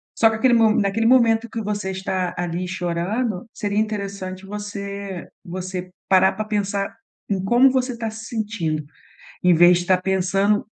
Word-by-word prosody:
Só 225 - +5
que 220 - -2
aquele 245 +2 +3
mo 225 -2 +5
naquele 205 +3 +1
momento 230 -2 +4
que 225 - -4
você 205 -2 -3
está 185 -1 -2
ali 175 +1 -2
chorando, 185 +4 -2
seria 205 -1 -3
interessante 200 -3 -4
você 200 -2 -6 0.2
você 185 +1 -5 0.2
parar 190 0 +5
para 215 +2 -4
pensar 200 -2 -2 0.3
em 190 -2 -1
como 240 +6 +5
você 255 0 0
está 230 -1 -4
se 220 +1 -9
sentindo. 205 -10 -3 0.6
Em 180 - +6
vez 175 +1 +7
de 175 - -2
estar 185 0 +3
pensando 195 +2 +1
200 Hz, 160 wpm, -22 LUFS, 185-220 Hz, 0.6 s, vez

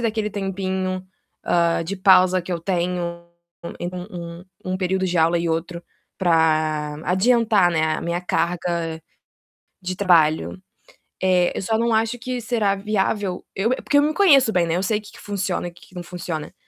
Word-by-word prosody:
daquele 220 -2 -1
tempinho, 190 -1 -3 0.4
hã, 170 -1 +2
de 195 +4 -4
pausa 185 -1 +5
que 175 - -9
eu 170 - -1
tenho, 175 -1 -2 0.5
em 175 - -3
um 175 -2 -8 0.2
um 185 0 -2
período 190 0 -1
de 180 0 -1
aula 165 +1 +3
e 170 0 -1
outro, 170 +1 -3 0.4
para 155 -3 +2
adiantar, 210 -1 +3
né, 160 -2 +1
a - - -5
minha 170 +1 -2
carga 170 -2 -2 0.8
de 185 0 -4
trabalho. 170 -2 +2 0.6
Eh, 180 -1 +3
eu - - -2
só 220 +3 0
não 235 0 +1
acho 225 +2 0
que 250 0 -4
será 220 -4 0
viável 200 -2 -1
eu 210 +5 0
é - - +3
porque 290 - +1
eu - - +6
me 305 +1 +1
conheço 280 - +5
bem, 175 -4 +1
né, 165 - 0
eu 180 - -1
sei 210 +2 +1
que 210 - -14
que - - -15
funciona 195 -3 -2
e - - -7
que 175 - -19
que 185 - -20
não 175 - -5
funciona. 170 -3 -6
185 Hz, 180 wpm, -22 LUFS, 170-205 Hz, 0.8 s, eu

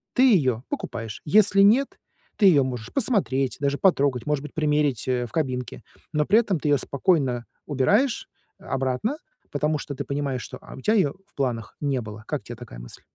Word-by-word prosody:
ты 255 - +5
её 130 - +2
покупаешь, 115 -3 -5
если 200 +4 +5
нет, 235 +8 +4 0.4
ты 205 - +6
её 150 -7 +6
можешь 125 -4 -5
посмотреть, 160 - 0
даже 140 0 0
потрогать, 140 - +2
может 150 -2 0
быть, 150 - -9
примерить, 150 -6 +1
э, 125 -1 0
в 115 - -11
кабинке, 125 - -3 0.3
но 150 0 +2
при 210 +7 +5
этом 200 -7 0
ты 150 - -3
её 145 - +5
спокойно 135 -5 0 0.2
убираешь, 205 - +1 0.3
э, 195 - -17
обратно, 135 - -1 0.3
потому 150 +1 0
что 145 - -6
ты - - -4
понимаешь, 140 -3 -2
что, - - -8
а, - - -11
у 130 - -10
тя 215 - +2
её 185 -10 +2
в - - -29
планах 120 -5 -2
не 140 -3 0
было. 110 0 -9
Как 150 -4 -3
те 120 - -8
такая 110 - -11
мысль? - - -11
140 Hz, 195 wpm, -24 LUFS, 125-175 Hz, 0.4 s, ты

